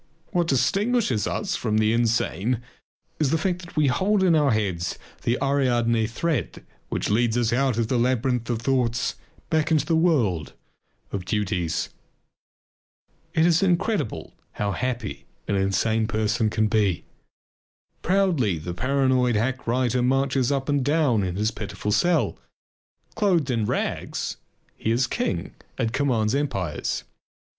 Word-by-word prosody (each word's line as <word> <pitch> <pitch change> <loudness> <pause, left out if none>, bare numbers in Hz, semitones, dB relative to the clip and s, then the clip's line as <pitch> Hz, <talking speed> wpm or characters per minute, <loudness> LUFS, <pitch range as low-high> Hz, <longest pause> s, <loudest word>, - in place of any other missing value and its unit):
What 175 -2 +1
distinguishes 195 - +1
us - - -2
from 110 -1 0
the 110 0 +3
insane 115 -1 +1 0.6
is 150 -3 +2
the 160 - +2
fact 180 +2 -1
that 175 - -12
we 155 - +4
hold 190 +10 +2
in 180 -3 +4
our 150 -3 +4
hands 95 -6 -1 0.2
the 120 +2 +1
Ariadne 120 -5 +2
thread 125 - -2 0.2
which - - -2
leads 115 +2 +2
us 115 -1 +1
out 130 -2 +1
of 115 -2 +1
the 125 +1 +1
labyrinth 125 -1 0
of 115 -1 -2
thoughts 125 -2 +1 0.4
back 160 0 +2
into 155 -3 +2
the 165 - +1
world 120 - +1 0.6
of 100 - -3
duties. 90 -5 -1 1.5
It 160 - +4
is 170 0 +4
incredible 175 - 0 0.2
how 105 -1 -1
happy 120 -1 -3 0.2
an - - 0
insane 110 +3 +1
person 110 0 +1
can 110 0 +1
be. 105 -5 +1 1.0
Proudly 170 - +2
the 85 +3 -5
paranoid 130 +1 +2
hack 125 +5 -1
writer 125 +1 +1
marches 135 0 +1
up 135 -1 -1
and 145 -2 +1
down 145 -6 +2
in 90 -2 -2
his 105 +3 0
pitiful 105 -1 -4
cell. 175 +9 +2 0.7
Clothed 180 - +1
in 115 -3 0
rags, - - -2 0.4
he - - -3
is 120 +3 +2
king 85 -7 -2 0.2
and 115 0 -1
commands 125 -5 +1
empires. 100 - -2
125 Hz, 140 wpm, -24 LUFS, 110-145 Hz, 1.5 s, we